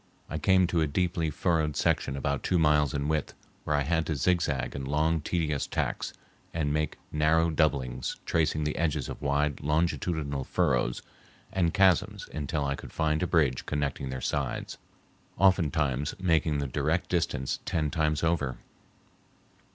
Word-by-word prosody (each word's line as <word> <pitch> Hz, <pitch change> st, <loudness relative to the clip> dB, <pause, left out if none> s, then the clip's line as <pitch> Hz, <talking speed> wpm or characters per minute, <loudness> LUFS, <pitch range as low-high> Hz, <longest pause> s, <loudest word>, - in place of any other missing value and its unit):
I 80 Hz, -, -2 dB
came 95 Hz, +4 st, +4 dB
to 85 Hz, -1 st, +1 dB
a 80 Hz, -, +2 dB
deeply 85 Hz, +1 st, 0 dB
furrowed 80 Hz, -1 st, 0 dB
section 70 Hz, -, +1 dB
about 70 Hz, 0 st, -1 dB
two 90 Hz, -, +1 dB
miles 75 Hz, -3 st, +3 dB
in 70 Hz, -1 st, -2 dB
width 75 Hz, -1 st, -1 dB, 0.3 s
where 75 Hz, -, +1 dB
I 75 Hz, -, +2 dB
had 80 Hz, +3 st, 0 dB
to 80 Hz, -, -1 dB
zigzag 75 Hz, -3 st, 0 dB
in 70 Hz, -, -4 dB
long, 75 Hz, +4 st, +1 dB
tedious 75 Hz, -3 st, -1 dB
tacks -, -, -2 dB, 0.4 s
and 75 Hz, -3 st, 0 dB
make 75 Hz, 0 st, -1 dB
narrow 80 Hz, +2 st, +3 dB
doublings, 65 Hz, -6 st, 0 dB
tracing 80 Hz, -1 st, +1 dB
the 75 Hz, -, -2 dB
edges 75 Hz, -5 st, 0 dB
of -, -, -7 dB
wide 70 Hz, 0 st, 0 dB
longitudinal 75 Hz, -2 st, 0 dB
furrows 65 Hz, -7 st, 0 dB, 0.5 s
and 85 Hz, -3 st, +2 dB
chasms 100 Hz, +3 st, +2 dB
until 75 Hz, 0 st, -2 dB
I 70 Hz, -, 0 dB
could -, -, -9 dB
find 80 Hz, -1 st, 0 dB
a 90 Hz, -, +1 dB
bridge 75 Hz, -8 st, +1 dB
connecting 70 Hz, -2 st, -2 dB
their 65 Hz, 0 st, -4 dB
sides, 70 Hz, -4 st, -2 dB, 0.6 s
oftentimes 80 Hz, -7 st, +2 dB
making 80 Hz, -4 st, +2 dB
the 70 Hz, -1 st, -2 dB
direct 75 Hz, +6 st, 0 dB
distance 75 Hz, -7 st, -1 dB
ten 75 Hz, -3 st, 0 dB
times 75 Hz, -1 st, 0 dB
over. 75 Hz, -6 st, 0 dB
75 Hz, 155 wpm, -28 LUFS, 70-85 Hz, 0.6 s, came